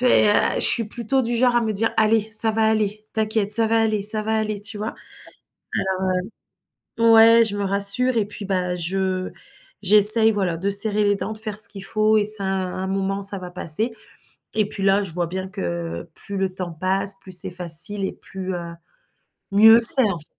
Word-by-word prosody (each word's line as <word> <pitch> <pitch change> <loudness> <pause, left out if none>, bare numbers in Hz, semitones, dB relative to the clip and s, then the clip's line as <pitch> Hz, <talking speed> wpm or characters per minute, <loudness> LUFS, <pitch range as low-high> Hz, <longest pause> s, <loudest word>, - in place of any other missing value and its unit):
et 245 -4 +3
heu, - - +3 0.2
je - - -2
suis 230 - +2
plutôt 240 +4 -2
du 235 0 -3
genre 245 0 +1
à - - +2
me 220 -2 -3
dire: 225 +3 -2
«Allez, 220 0 +1
ça 225 0 +3
va 220 0 -1
aller, 215 -1 -3
t'inquiète, 215 -1 0
ça 225 -1 +6
va 225 0 +1
aller, 215 -2 -2
ça 215 +1 +1
va 220 +1 -2
aller», 215 -2 -4
tu 205 +1 -7
vois? 215 +2 -6 2.0
Alors, 230 0 +3
heu, 230 +1 +6
ouais, - - +5
je 205 - -4
me 205 - -3
rassure 200 +6 +2
et 215 - 0
puis 205 +1 -11
bah, 180 -2 -3
je 185 +1 -4 0.5
j'essaie 215 +3 +7
voilà, 185 -5 -3
de 195 +4 -3
serrer 210 +1 +4
les 205 0 +1
dents, 210 - -6
de - - -9
faire 215 -1 -6
ce 215 +2 +2
qu'il 195 -2 -11
faut 215 0 0
et 210 - 0
c'est 210 -1 +3
un 190 - -3
un 190 0 -4
moment 195 +1 -3
ça 200 0 0
va 180 -1 -9
passer, 180 +6 0 0.6
et 215 -2 0
puis 195 -1 -8
là, 195 +1 +1
je 185 -5 -10
vois 175 0 -3
bien 190 +2 -6
que 85 - -7
plus 200 - -10
le 190 -1 -3
temps 180 -2 -7
passe, 195 +4 -1
plus 185 - -14
c'est 185 +1 +1
facile 180 +3 -3
et - - -4
plus, 190 -1 -9
heu, 170 -1 -7 0.8
mieux 220 +3 +6
c'est 260 +3 +7
en 195 -5 -2
fai 150 - -16
205 Hz, 215 wpm, -20 LUFS, 190-220 Hz, 2.0 s, j'essaie